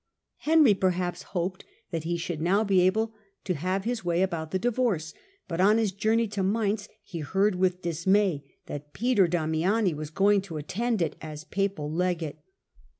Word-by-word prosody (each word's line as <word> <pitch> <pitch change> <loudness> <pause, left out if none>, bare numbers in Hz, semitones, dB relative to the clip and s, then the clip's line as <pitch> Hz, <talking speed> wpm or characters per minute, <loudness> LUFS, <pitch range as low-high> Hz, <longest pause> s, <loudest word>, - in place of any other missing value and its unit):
Henry, 305 -7 +5
perhaps, 180 -2 0 0.2
hoped 185 +2 -2 0.3
that 165 -2 -3
he 170 +1 0
should 165 -2 -4
now 195 +6 +3
be 195 -3 +3
able 220 +5 +2 0.3
to 185 - -1
have 185 +5 -1
his 235 0 -2
way 175 +1 +2
about 165 -4 -2
the 190 - 0
divorce; 220 -7 0 0.3
but 170 +1 -1
on 210 +3 +5
his 220 -3 +1
journey 220 +4 +1
to 205 -1 -2
Mainz 205 +1 0
he 170 -4 -7
heard 195 +7 +1
with 180 0 0
dismay 175 -1 +1 0.2
that 145 0 -8
Peter 230 -5 +3
Damiani 175 +4 +1
was 150 0 -5
going 200 +4 +3
to 180 -5 -7
attend 215 +7 -1
it - - -3
as 155 -1 -7
papal 195 -5 -2
legate. 170 -2 -1
185 Hz, 170 wpm, -27 LUFS, 165-205 Hz, 0.3 s, Henry